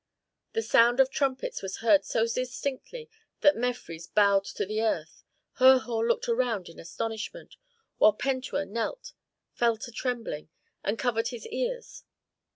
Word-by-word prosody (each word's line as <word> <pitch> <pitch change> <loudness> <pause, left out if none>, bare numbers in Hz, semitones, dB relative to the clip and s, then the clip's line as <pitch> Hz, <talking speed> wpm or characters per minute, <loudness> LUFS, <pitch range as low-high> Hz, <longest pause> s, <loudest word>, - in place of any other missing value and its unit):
The 450 - 0
sound 240 - +4
of 265 0 +5
trumpets 270 -2 -1
was 195 -1 -5
heard 235 +6 +4
so 225 - +1
distinctly 260 - -4 0.3
that 295 - +6
Mefres 230 -9 -4
bowed 200 -2 +3
to - - -3
the 215 +3 -2
earth, 225 - -2 0.4
Herhor 255 -3 +5
looked 235 - 0
around 235 -6 0
in 165 - -13
astonishment, 225 - -6 0.4
while 215 - +7
Pentuer 260 -3 -2
knelt, 235 - -4 0.4
fell 235 -2 +2
to 240 - -8
trembling, 230 - -4 0.3
and 205 +3 -1
covered 230 -3 0
his 240 -2 -7
ears. - - -4
235 Hz, 140 wpm, -28 LUFS, 220-265 Hz, 0.4 s, while